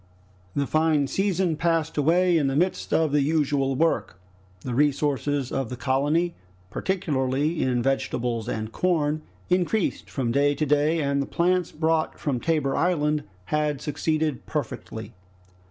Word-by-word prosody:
The 140 - +1
fine 155 -1 +2
season 190 +1 0
passed 165 -1 0
away 170 +4 +3
in 150 -4 +2
the 135 - 0
midst 180 +5 0
of 160 -2 +2
the 145 0 +3
usual 140 -2 +1
work. 160 - 0 0.4
The 125 - -4
resources 145 -1 +1
of 135 -4 -2
the 125 - -5
colony, 145 +7 +1 0.4
particularly 150 -4 0
in 125 -2 +1
vegetables 120 -3 -1
and 110 -2 -3
corn, 155 -3 0 0.3
increased 180 +3 0
from 125 -4 -1
day 145 +2 +3
to 155 - 0
day, 150 +2 +2
and 140 0 +1
the 140 - -3
plants 180 0 +1
brought 160 0 0
from 135 -5 -1
Tabor 150 -2 0
Island 150 -4 +1 0.2
had 150 0 0
succeeded 155 -1 -1
perfectly. 115 -6 -5
150 Hz, 140 wpm, -25 LUFS, 135-165 Hz, 0.4 s, away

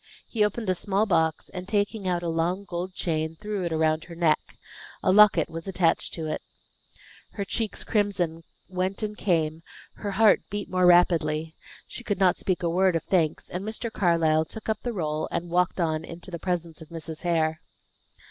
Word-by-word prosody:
He 220 -3 0
opened 210 +1 -1
a 185 - +3
small 195 +3 0
box, 160 -5 +1
and 180 -1 -7
taking 205 -1 0
out 175 -1 0
a - - -2
long, 170 +4 0
gold 180 +1 -5
chain, 160 -1 -1
threw 210 -3 -3
it 170 - -2
around 155 0 +1
her 170 - -10
neck. 165 -3 +3 0.6
A - - +4
locket 200 -5 +6
was 165 +1 -7
attached 180 -3 +1
to 160 - -4
it. 155 - -3 0.9
Her 200 - -3
cheeks' 220 +2 -2
crimson 185 -6 0 0.3
went 185 +2 -2
and 210 0 -3
came; 160 -5 0 0.4
her 205 - -4
heart 215 +1 +5
beat 205 -1 -5
more 185 -1 +4
rapidly. 160 -3 +3 0.3
She 245 - -8
could 205 -4 -1
not 185 -2 +4
speak 185 -2 -1
a - - +2
word 185 +1 +3
of 165 - 0
thanks; 165 -5 +1
and 180 +2 -5
Mr. 220 +2 -4
Carlyle 165 -5 +3
took 220 +7 -9
up 215 -1 0
the 245 - -2
roll, 155 -6 -2
and 170 0 -3
walked 180 +1 +1
on 160 -2 0
into 170 +3 -9
the 170 - -5
presence 170 -3 -3
of 160 - -11
Mrs. 165 -1 -6
Hare. 160 -2 +1
175 Hz, 190 wpm, -26 LUFS, 165-195 Hz, 0.9 s, locket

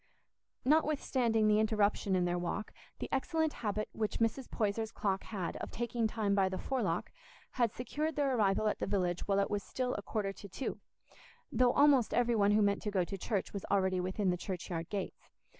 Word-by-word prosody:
Notwithstanding 260 -7 +2
the 210 0 +4
interruption 210 -2 +2
in 180 -1 +2
their 175 0 0
walk, 175 +4 -3 0.2
the - - -4
excellent 315 +3 0
habit 215 -1 -1
which 215 -1 -2
Mrs. 230 +3 0
Poyser's 220 0 -1
clock 195 -3 -1
had 190 -6 -4
of - - -5
taking 235 -1 -1
time 215 -2 0
by 195 -1 +3
the 185 - -3
forelock 265 +4 -1 0.4
had 235 -4 +1
secured 300 +7 -3
their 275 -3 +1
arrival 210 -1 +2
at 210 - 0
the - - -2
village 180 -3 0
while 200 -1 +2
it 200 - +1
was 205 -1 0
still 255 +3 -2
a - - -3
quarter 200 -1 -2
to 200 - -11
two, 265 - -4 0.7
though 250 -1 +4
almost 280 -6 +5
every 240 0 +3
one 200 -2 +4
who 215 0 +4
meant 200 0 +2
to 210 - -2
go 195 -3 +1
to 195 - -5
church 195 +1 -2
was 200 - -4
already 190 -2 +2
within 185 +1 0
the 180 - -1
churchyard 175 -2 -4
gates. 200 -2 -5
210 Hz, 195 wpm, -33 LUFS, 195-240 Hz, 0.7 s, almost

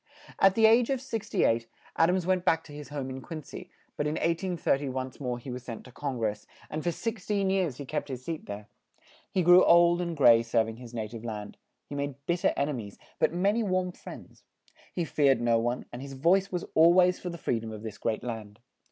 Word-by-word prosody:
At 195 0 +5
the 225 - +5
age 230 +2 +5
of 270 -2 0
six 235 -5 -5
ty 195 - +1
eight, 115 0 +1 0.3
Ad 165 +1 +4
ams 180 -1 +1
went 185 -1 +1
back 165 -3 +2
to 150 - -14
his 145 -1 -9
home 140 -3 -4
in 130 0 -6
Quin 155 +1 -7
cy, - - -10 0.3
but 150 - -1
in 150 - -1
1830 165 -5 0
once 130 0 -5
more 125 -3 -2
he 125 +2 -8
was 125 +1 -5
sent 115 -3 -8
to 125 - -14
Con 135 0 -4
gress, 105 -2 -2 0.2
and 155 0 -3
for 175 - +1
six 220 +3 -4
teen 200 -2 +1
years 180 -9 0
he 140 - -7
kept 150 +2 -3
his 130 -1 -6
seat 165 -2 -5
there; 105 0 -7 0.6
he 185 - +1
grew 175 +2 +8
old 170 +1 +5
and 170 -2 -3
gray 120 -5 +7
serv 115 -1 +1
ing 115 - -8
his 120 -1 -11
na 110 -2 -2
tive 110 +1 -9
land; 105 -3 -6 0.3
he - - -10
made 140 -1 -3
bit 175 0 0
ter 190 - +3
en 140 +1 +1
e - - -1
mies, 100 - -14 0.2
but - - +3
ma 180 +4 +2
ny 230 +2 0
warm 185 -3 0
friends; - - -12 0.5
he 175 - -2
feared 140 -3 +3
no 115 -1 +2
one, 120 +2 -2
and 120 - -6
his 135 0 -8
voice 180 +8 +2
was 180 -1 -3
al 165 +2 +7
ways 180 0 +4
for 180 - -5
the 170 - -6
free 120 -7 -1
dom 110 0 -7
of 110 0 -8
this 110 -2 -7
great 110 -1 -2
land. 110 -4 -6
150 Hz, 250 wpm, -28 LUFS, 120-180 Hz, 0.6 s, grew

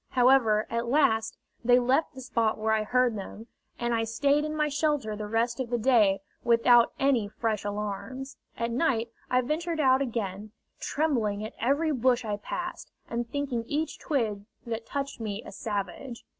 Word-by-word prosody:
However, 245 -4 +4
at 235 +1 -1
last 225 -5 +2 0.3
they 245 +1 +6
left 260 +5 +1
the 260 - -8
spot 230 -3 0
where 220 0 +1
I 220 - +2
heard 245 +1 +2
them, 210 +2 -7 0.3
and 240 0 -1
I 225 -1 +1
stayed 280 +6 +2
in 305 0 -3
my 300 -1 +1
shelter 290 -7 0
the 210 0 -5
rest 230 +3 0
of 255 -3 -2
that 240 -2 -1
day 210 -7 +4 0.2
without 235 0 +5
any 270 -6 +2
fresh 215 0 -2
alarms. 210 +6 -5 0.2
At 235 0 -1
night 235 -3 0 0.2
I 255 0 +3
ventured 320 +5 -2
out 265 -2 +4
again, 215 -4 -3 0.3
trembling 225 -9 0
at 220 - -7
every 285 +7 +1
bush 250 -2 +2
I 210 -1 -2
passed, 355 +11 -5 0.2
and 235 0 -3
thinking 270 -4 -2
each 305 +4 -2
twig 215 -8 -1 0.2
that 230 -1 -4
touched 275 -2 -4
me 215 -1 -4
a - - -8
savage. 225 +4 -5
235 Hz, 170 wpm, -28 LUFS, 220-270 Hz, 0.3 s, they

